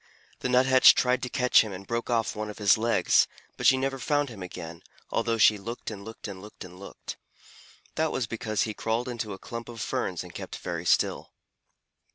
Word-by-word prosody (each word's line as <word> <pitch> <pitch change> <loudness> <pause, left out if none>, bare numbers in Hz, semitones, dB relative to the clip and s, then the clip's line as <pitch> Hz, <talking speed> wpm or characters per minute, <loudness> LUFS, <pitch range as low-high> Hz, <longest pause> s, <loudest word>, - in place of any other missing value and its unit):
The 125 - -2
Nuthatch 130 +1 +7
tried 125 0 +2
to 125 - -3
catch 125 0 +4
him 110 - -4
and 95 +1 -8
broke 115 +2 -3
off 115 -2 0
one 105 0 -4
of 105 - -8
his 105 -3 +5
legs, 115 +1 +3 0.3
but - - +1
she 130 - +6
never 135 0 -2
found 145 +3 0
him 110 -5 -10
again, 85 -2 -8 0.3
although 115 0 0
she 105 -1 +5
looked 115 +3 -6
and 100 -2 -8
looked 110 +2 -8
and 95 -2 -8
looked 105 +1 -11
and 90 0 -13
looked. 100 - -9 0.8
That 160 0 0
was 125 - -1
because 110 -1 -2
he 110 - -3
crawled 115 +3 -2
into 115 -4 -4
a - - -7
clump 115 +3 -7
of 115 -1 -9
ferns - - -2
and - - -12
kept - - -7
very - - -5
still. - - +1
115 Hz, 205 wpm, -27 LUFS, 105-125 Hz, 0.8 s, Nuthatch